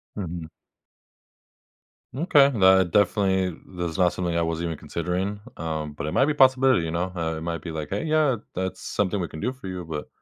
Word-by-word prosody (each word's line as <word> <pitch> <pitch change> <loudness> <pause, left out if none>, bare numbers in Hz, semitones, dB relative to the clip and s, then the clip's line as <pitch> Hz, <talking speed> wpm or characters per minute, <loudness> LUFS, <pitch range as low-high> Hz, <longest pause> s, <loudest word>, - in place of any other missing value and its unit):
Mhm. 85 -4 -5 1.6
Okay. 140 -1 +5
That 95 - +4
definitely 95 -3 +2 0.2
that's 85 -1 -3
not 90 -2 +4
something 85 -2 -2
I 85 - +2
was 80 0 -1
even 85 -1 -2
considering, 90 +6 -3 0.2
um, 80 -2 -4
but 75 - -5
it 75 - -2
might 135 - +3
be 150 - +1
a - - -12
possibility, 130 -5 +5
you 80 - -3
know? 90 +2 -1 0.3
It - - -6
might 85 0 -3
be 85 - -6
like, 75 -2 -5
"Hey, - - -2
yeah, 155 -5 +2 0.2
that's 95 0 -3
something 100 -1 -1
we 85 - -3
can 80 - -8
do 125 +8 -1
for 125 -7 -10
you." 90 -2 -5
But 75 -2 -5
90 Hz, 200 wpm, -25 LUFS, 85-105 Hz, 1.6 s, Okay